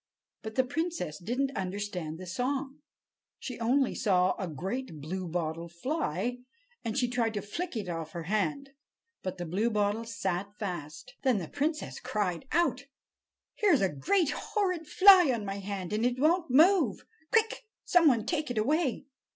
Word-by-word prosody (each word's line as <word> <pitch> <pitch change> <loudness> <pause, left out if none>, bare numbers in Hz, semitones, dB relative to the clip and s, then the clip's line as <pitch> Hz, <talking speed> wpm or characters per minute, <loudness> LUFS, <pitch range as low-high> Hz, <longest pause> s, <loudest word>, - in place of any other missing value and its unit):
But 220 0 -7
the 260 - +4
princess 285 - -3
didn't 265 +8 -1
understand 185 -4 -3
the 185 - -8
song. 270 - -2 0.6
She 250 -3 -7
only 255 +3 +2
saw 185 -3 +2
a 190 - -2
great 185 - -4
bluebottle 170 0 -3
fly, 240 - -2 0.4
and 225 +1 -2
she 250 -2 +2
tried 235 -2 0
to 205 - -1
flick 325 - -4
it 205 -4 -4
off 165 -2 -5
her 170 - -4
hand. 275 - -1 0.5
But 185 0 -4
the 175 - -4
Bluebottle 210 +4 0
sat 200 -2 -3
fast. 180 - -6
Then 260 -5 +3
the 175 -5 -4
princess 305 - -2
cried 210 -4 -2
out: 300 -4 +1 0.7
"Here's 380 -10 +3
a 190 - +3
great 335 - +2
horrid 365 -7 -1
fly 375 -4 +8
on 225 -4 -2
my 195 0 -4
hand, 195 -2 -4
and 215 +2 0
it 245 +1 +1
won't 330 +4 +2
move! 335 +8 +4 0.3
Quick! 450 +1 +1 0.2
some 350 -3 +5
one 235 -6 +3
take 310 0 -1
it 245 - -3
away!" 280 +4 +1
230 Hz, 160 wpm, -30 LUFS, 185-285 Hz, 0.7 s, fly